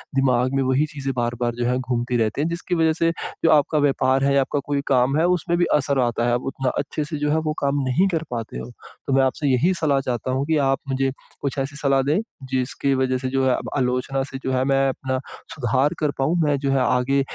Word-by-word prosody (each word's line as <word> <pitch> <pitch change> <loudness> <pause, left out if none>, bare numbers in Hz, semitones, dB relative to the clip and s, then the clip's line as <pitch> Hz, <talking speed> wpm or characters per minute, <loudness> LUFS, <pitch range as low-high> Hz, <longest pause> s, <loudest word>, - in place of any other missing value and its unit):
दिमाग 130 -1 +2
में 135 - +2
वही 130 +3 +2
चीज़ें 135 -2 -3
बार-बार 120 0 -1
जो 120 0 -2
है, 125 +1 +1
घूमती 125 -1 -1
रहती 110 +3 0
हैं 155 - +1
जिसकी 170 +1 -3
वजह 160 -1 +3
से 165 +1 +1 0.3
जो - - +5
आपका 155 0 +3
व्यापार 135 -2 +2
है 140 0 +3
या 140 - +5
आपका 140 +2 -1
कोई 145 -1 -1
काम 130 +1 +3
है 165 - +3
उसमें 175 -1 +1
भी 175 - +3
असर 140 -2 +1
आता 120 -1 0
है 120 - +2
आप 120 - 0
उतना 135 -1 -1
अच्छे 145 +2 -2
से 155 +1 -5
जो 150 0 -1
है 160 - +2
वो 155 - +1
काम 140 0 0
नहीं 175 +10 +3
कर 165 -3 -1
पाते 115 - -4
हो। 60 0 -7 0.4
तो 135 - 0
मैं 135 0 +4
आपसे 140 +3 0
यही 140 +8 +3
सलाह 150 -5 +1
चाहता 125 -1 -3
हूँ 135 +2 0
कि 160 0 +1
आप 135 -1 +2
मुझे 135 0 0 0.3
कुछ 140 0 -3
ऐसी 135 +2 -3
सलाह 140 -2 +2
दें, 150 +8 +1 0.3
जिसकी 130 +2 0
वजह 130 0 +1
से 130 +1 -4
जो 135 0 +1
है 130 - +3
अब - - -5
आलोचना 125 +1 0
से 135 -1 -7
जो 130 - -1
है 130 0 +2
मैं 135 0 +2
अपना 130 0 -3 0.4
सुधार 130 +1 +1
कर 150 -2 +1
पाऊँ। 150 +6 +1
मैं 145 -2 +2
जो 135 -1 -1
है 135 - +2
आगे 125 +2 +2
135 Hz, 250 wpm, -22 LUFS, 130-145 Hz, 0.4 s, जो